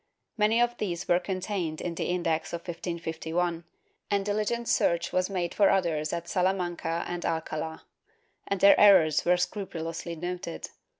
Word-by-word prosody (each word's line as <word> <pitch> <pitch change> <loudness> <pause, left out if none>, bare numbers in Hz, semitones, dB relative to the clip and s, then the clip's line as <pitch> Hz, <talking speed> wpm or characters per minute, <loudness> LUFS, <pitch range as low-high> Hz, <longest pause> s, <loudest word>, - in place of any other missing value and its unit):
Many 220 +1 +3
of 240 0 +2
these 175 -5 -3
were 175 - +4
contained 185 -4 -3
in 175 - -3
the - - -3
Index 170 -3 -1
of 170 - -3
1551, 170 0 -3 0.4
and 200 -1 +1
dihgent 215 +3 -1
search 170 0 +1
was 185 +1 +1
made 180 -3 -2
for 200 - +4
others 165 -5 +1
at 170 0 -4
Salamanca 175 -3 -1
and 175 0 -4
Alcala, 160 0 -3 0.6
and 200 -2 -2
their 200 - +7
errors 165 -7 +6
were 180 +1 +4
scrupulously 170 -3 -4
noted. 175 0 -5
175 Hz, 145 wpm, -28 LUFS, 165-195 Hz, 0.6 s, their